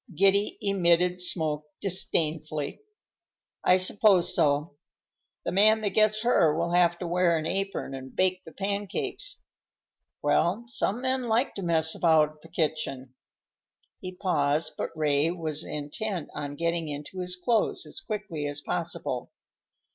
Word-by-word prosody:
Giddy 195 Hz, +3 st, +3 dB
emitted 180 Hz, -2 st, +2 dB
smoke 155 Hz, -4 st, +1 dB
disdainfully. 155 Hz, -, -1 dB, 0.8 s
"I 180 Hz, -, +5 dB
suppose 185 Hz, 0 st, +4 dB
so. 145 Hz, -1 st, +1 dB, 0.7 s
The -, -, -1 dB
man 215 Hz, +3 st, +5 dB
that 205 Hz, -2 st, 0 dB
gets 215 Hz, 0 st, +3 dB
her 165 Hz, -10 st, +3 dB
will 170 Hz, +1 st, -1 dB
have 175 Hz, -1 st, +3 dB
to 175 Hz, -, -5 dB
wear 175 Hz, -1 st, +2 dB
an 155 Hz, -, -3 dB
apron 195 Hz, -5 st, -2 dB
and 130 Hz, 0 st, -8 dB
bake 185 Hz, 0 st, +1 dB
the 160 Hz, -, -12 dB
pancakes. 200 Hz, -, -4 dB, 0.8 s
Well, 200 Hz, +8 st, +1 dB
some 235 Hz, 0 st, -2 dB
men 260 Hz, -1 st, 0 dB
like 230 Hz, +4 st, +1 dB
to 200 Hz, -, -6 dB
mess 160 Hz, -2 st, +1 dB
about 155 Hz, -2 st, +2 dB
the 165 Hz, -, -15 dB
kitchen." 155 Hz, -6 st, -2 dB, 0.9 s
He 185 Hz, -, -6 dB
paused, 155 Hz, -4 st, 0 dB
but -, -, -3 dB
Ray 150 Hz, 0 st, +2 dB
was 160 Hz, -3 st, -2 dB
intent 155 Hz, +4 st, -4 dB
on 145 Hz, -1 st, -5 dB
getting 170 Hz, +1 st, -1 dB
into 150 Hz, +5 st, -6 dB
his 180 Hz, 0 st, -2 dB
clothes 220 Hz, +5 st, 0 dB
as -, -, -6 dB
quickly 210 Hz, -, -4 dB
as 145 Hz, 0 st, -4 dB
possible. -, -, -4 dB
175 Hz, 140 wpm, -27 LUFS, 155-195 Hz, 0.9 s, I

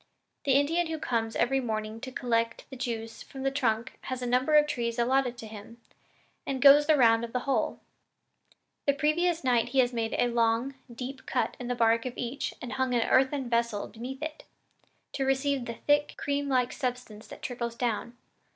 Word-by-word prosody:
The 275 Hz, -, +3 dB
Indian 320 Hz, +5 st, +2 dB
who 320 Hz, 0 st, -3 dB
comes 225 Hz, -6 st, -1 dB
every 270 Hz, +3 st, +2 dB
morning 220 Hz, -2 st, -3 dB
to 260 Hz, -, -6 dB
collect 230 Hz, -2 st, -1 dB
the -, -, -6 dB
juice 225 Hz, -3 st, -4 dB
from 265 Hz, -1 st, -8 dB
the 270 Hz, -, +1 dB
trunk 240 Hz, -3 st, -1 dB
has 255 Hz, -1 st, -4 dB
a -, -, -1 dB
number 255 Hz, +5 st, +2 dB
of 300 Hz, 0 st, +7 dB
trees 235 Hz, -5 st, -2 dB
allotted 250 Hz, 0 st, +1 dB
to 230 Hz, -, -8 dB
him, 220 Hz, +2 st, -11 dB, 0.6 s
and 270 Hz, -1 st, -3 dB
goes 285 Hz, +2 st, +8 dB
the 310 Hz, -2 st, +5 dB
round 230 Hz, -3 st, +5 dB
of 235 Hz, -, -6 dB
the 250 Hz, -, 0 dB
whole. 275 Hz, +1 st, 0 dB, 1.1 s
The 280 Hz, -, +5 dB
previous 325 Hz, +4 st, +1 dB
night 245 Hz, -2 st, +2 dB
he 270 Hz, -, -4 dB
has 245 Hz, -1 st, +3 dB
made 225 Hz, -1 st, -1 dB
a -, -, +3 dB
long, 235 Hz, +2 st, +1 dB, 0.2 s
deep 255 Hz, +3 st, -7 dB
cut 255 Hz, -, 0 dB
in 245 Hz, -, -5 dB
the 245 Hz, -, -1 dB
bark 230 Hz, +1 st, +2 dB
of 245 Hz, -, -7 dB
each 245 Hz, +3 st, -3 dB
and 245 Hz, -, -5 dB
hung 260 Hz, -1 st, 0 dB
an 230 Hz, -1 st, +2 dB
earthen 265 Hz, 0 st, +2 dB
vessel 235 Hz, -3 st, 0 dB
beneath, 255 Hz, +5 st, -7 dB, 0.9 s
to 270 Hz, -, -2 dB
receive 270 Hz, -1 st, +1 dB
the 235 Hz, -, -5 dB
thick, 290 Hz, +4 st, +1 dB
creamlike 280 Hz, -3 st, 0 dB
substance 250 Hz, -5 st, -4 dB
that -, -, -12 dB
trickles 235 Hz, -2 st, -3 dB
down. 240 Hz, 0 st, -2 dB
250 Hz, 190 wpm, -28 LUFS, 235-270 Hz, 1.1 s, goes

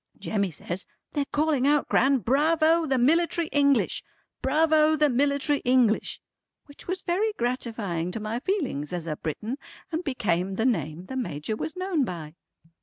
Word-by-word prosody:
Jemmy 200 Hz, -3 st, -1 dB
says, 175 Hz, +3 st, -5 dB, 0.3 s
"They're 285 Hz, -1 st, 0 dB
calling 295 Hz, -3 st, +2 dB
out 295 Hz, 0 st, +3 dB
Gran, 275 Hz, +1 st, +4 dB
Bravo 315 Hz, +6 st, +3 dB
the 270 Hz, -2 st, +2 dB
Military 330 Hz, +6 st, +2 dB
English! 280 Hz, -2 st, +2 dB, 0.4 s
Bravo 310 Hz, +2 st, +4 dB
the 300 Hz, -2 st, +3 dB
Military 280 Hz, +2 st, +1 dB
English!" 245 Hz, -3 st, +2 dB, 0.5 s
which 285 Hz, -, -15 dB
was 370 Hz, +1 st, -3 dB
very 415 Hz, +5 st, 0 dB
gratifying 230 Hz, -, -2 dB
to 200 Hz, -, -4 dB
my 220 Hz, +2 st, -3 dB
feelings 265 Hz, -, -2 dB
as 175 Hz, -2 st, -3 dB
a 155 Hz, -2 st, -2 dB
Briton 220 Hz, -, -4 dB, 0.3 s
and 325 Hz, +2 st, -2 dB
became 195 Hz, -, -1 dB
the 225 Hz, -, 0 dB
name 175 Hz, -9 st, -1 dB
the 265 Hz, -, -7 dB
Major 215 Hz, -, -3 dB
was 315 Hz, +10 st, -5 dB
known 370 Hz, -5 st, 0 dB
by. 165 Hz, -9 st, -5 dB
265 Hz, 155 wpm, -26 LUFS, 210-310 Hz, 0.5 s, Gran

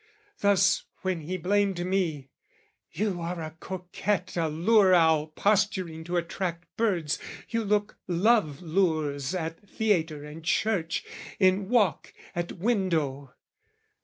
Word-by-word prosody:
Thus, 200 Hz, -1 st, +3 dB, 0.2 s
when 185 Hz, -2 st, 0 dB
he 180 Hz, +5 st, -3 dB
blamed 190 Hz, 0 st, +1 dB
me, 165 Hz, -8 st, -1 dB, 0.6 s
"You 200 Hz, -4 st, -2 dB
are 170 Hz, +1 st, -3 dB
a 155 Hz, -1 st, -6 dB
coquette, 185 Hz, +1 st, -3 dB
"A 165 Hz, -2 st, +1 dB
lure 185 Hz, +4 st, +4 dB
owl 160 Hz, -3 st, +4 dB
posturing 185 Hz, -2 st, 0 dB
to 175 Hz, +1 st, -1 dB
attract 170 Hz, 0 st, -4 dB
birds, 175 Hz, -10 st, 0 dB, 0.3 s
"You 230 Hz, 0 st, 0 dB
look 205 Hz, 0 st, 0 dB
love 180 Hz, -4 st, +2 dB
lures 155 Hz, -4 st, 0 dB
at 165 Hz, +3 st, -5 dB
theatre 165 Hz, -9 st, 0 dB
and 150 Hz, +2 st, -9 dB
church, 175 Hz, -1 st, 0 dB, 0.3 s
"In 190 Hz, 0 st, +3 dB
walk, 210 Hz, -, +1 dB, 0.2 s
at 175 Hz, 0 st, -2 dB
window!" 165 Hz, -, -1 dB
180 Hz, 120 wpm, -27 LUFS, 160-200 Hz, 0.6 s, lure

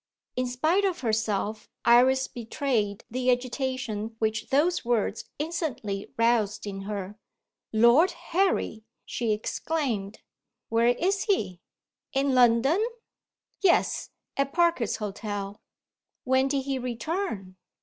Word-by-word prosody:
In 255 Hz, 0 st, 0 dB
spite 315 Hz, +11 st, +1 dB
of 370 Hz, -3 st, 0 dB
herself, 215 Hz, -2 st, -1 dB, 0.2 s
Iris 255 Hz, +3 st, +5 dB
betrayed 230 Hz, -4 st, -2 dB
the 255 Hz, +1 st, 0 dB
agitation 245 Hz, -3 st, -1 dB
which 220 Hz, 0 st, -1 dB
those 320 Hz, +6 st, +2 dB
words 235 Hz, -3 st, 0 dB
instantly 290 Hz, -, -3 dB
roused 230 Hz, -3 st, +2 dB
in 195 Hz, -1 st, -5 dB
her. 205 Hz, 0 st, -5 dB, 0.5 s
"Lord 235 Hz, +11 st, +6 dB, 0.2 s
Harry!" 360 Hz, -, +1 dB, 0.2 s
she 235 Hz, -2 st, -1 dB
exclaimed. 220 Hz, -2 st, -2 dB, 0.5 s
"Where 230 Hz, +1 st, +3 dB
is 370 Hz, +11 st, +1 dB
he? 195 Hz, -, 0 dB, 0.5 s
In 270 Hz, 0 st, +2 dB
London?" 250 Hz, -, +4 dB, 0.8 s
"Yes 380 Hz, -3 st, +2 dB, 0.3 s
at 275 Hz, 0 st, 0 dB
Parker's 340 Hz, -10 st, +2 dB
Hotel." 205 Hz, -1 st, -5 dB, 0.6 s
"When 260 Hz, +1 st, +3 dB
did 275 Hz, -1 st, 0 dB
he 270 Hz, -1 st, -2 dB
return?" 240 Hz, -, -3 dB
245 Hz, 110 wpm, -27 LUFS, 215-280 Hz, 0.8 s, Lord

